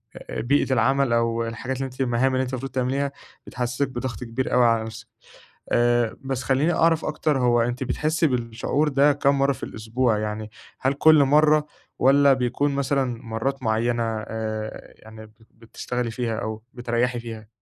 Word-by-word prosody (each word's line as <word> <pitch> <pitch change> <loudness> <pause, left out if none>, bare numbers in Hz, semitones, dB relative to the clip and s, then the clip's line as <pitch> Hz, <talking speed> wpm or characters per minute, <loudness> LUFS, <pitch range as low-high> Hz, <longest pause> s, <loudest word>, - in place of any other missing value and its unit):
أ - - -6
بيئة 135 +2 +1
العمل 130 +1 +2
أو 115 0 +1
الحاجات 125 +3 -4
اللي 135 - -2
أنتِ 130 +1 -7
المهام 130 +1 +1
اللي 130 0 +1
أنتِ 130 - -5
المفروض 135 +2 -4
تعمليها، 135 +2 -1 0.4
بتتحسّسِك 125 +2 -2
بضغط 125 0 -5
كبير 120 +3 -3
أوي 125 -1 +5
على 115 -1 +3
نفسِك. 115 +1 -9 0.6
آآ 120 -1 +2
بس 135 -1 -2
خلّيني 145 +6 +2
أعرف 165 -1 +2
أكتر 150 -2 0
هو 120 -1 +3
أنتِ 120 +2 -1
بتحسّي 155 +4 0
بالشعور 125 +4 -1
ده 140 +1 +4
كام 140 -1 +1
مرّة 140 0 +3
في - - -12
الأسبوع؟ 110 +1 -1
يعني 105 0 -4 0.3
هل 130 +2 +2
كل 155 0 +6
مرّة 150 +2 +4 0.3
والّا 140 +1 +5
بيكون 130 +3 0
مثلًا 135 -4 -1
مرّات 125 +4 -3
معيّنة 115 +2 +1 0.2
آآ 110 -1 -5
يعني 110 0 -12
ب - - -22 0.2
بتشتغلي 115 +1 -5
فيها 115 -1 -2
أو 110 -1 -5
بتريّحي 120 0 -1
فيها؟ 115 -2 -8
125 Hz, 165 wpm, -24 LUFS, 115-135 Hz, 0.6 s, كل